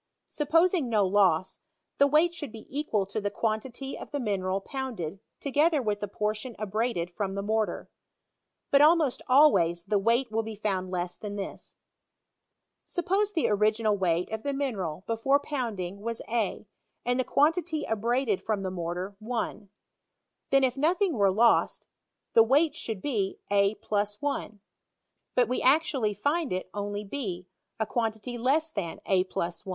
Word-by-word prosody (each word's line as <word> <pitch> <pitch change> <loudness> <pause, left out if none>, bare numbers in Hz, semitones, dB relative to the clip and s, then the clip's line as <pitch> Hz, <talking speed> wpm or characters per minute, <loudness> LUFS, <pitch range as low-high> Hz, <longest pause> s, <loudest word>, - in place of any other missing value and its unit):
Supposing 330 -1 +2
no 210 -3 +3
loss, 190 -2 +2 0.4
the 280 - +6
weight 310 +4 +3
should 295 -7 -6
be 220 -1 -10
equal 225 -9 0
to 200 +2 -4
the 205 - -1
quantity 235 +6 -3
of - - -9
the 285 - -3
mineral 195 -5 -1
pounded 205 - -5 0.2
together 295 +3 +2
with 210 -5 -1
the 205 - -3
portion 210 +4 -3
abraded 215 -3 -1
from 195 +1 -3
the 200 - -3
mortar. 220 +1 -1 0.8
But 280 - +6
almost 305 -3 +4
always 190 - +5
the 210 -2 +1
weight 230 +4 +2
will 225 +1 +1
be 220 0 -7
found 195 -3 -2
less 180 -1 -3
than 205 +1 -6
this, 195 -1 -7 1.1
Sup[}OBe 390 +4 0
the 320 - +2
original 215 +1 +2
weight 180 -2 0
of 220 0 -3
the 280 +3 -2
mi 275 -1 -1
neral 185 -4 -5
before 230 +5 +2
pouiidingwas 225 -6 -4
a, 225 -2 -1 0.4
and 245 +1 +1
the - - +3
quantity 315 +3 +1
abraded 225 -1 0
from 205 -1 -2
the 185 - -2
mortar 180 +2 -4 0.2
I; 220 -3 -3 0.8
then, 275 0 +4
if 255 -1 +2
nothing 345 +6 +2
were 200 -4 +3
lost, 230 +4 +3 0.5
the 225 - +8
weight 285 +7 +4
should 220 -10 -4
be 210 -9 -1
a 200 +1 +3
+ 205 -1 -2
1; 280 -7 -3 0.8
but 250 - +4
we 250 - -1
actually 265 -6 +2
find 290 +8 0
it 185 0 -3
only 205 0 -3
b, 195 -6 -5 0.3
a 220 - +1
quantity 225 +2 -2
less 305 +6 +1
than 170 - -4
a 185 -1 +3
+ 185 - -24
I. 170 - 0
220 Hz, 160 wpm, -28 LUFS, 200-275 Hz, 1.1 s, the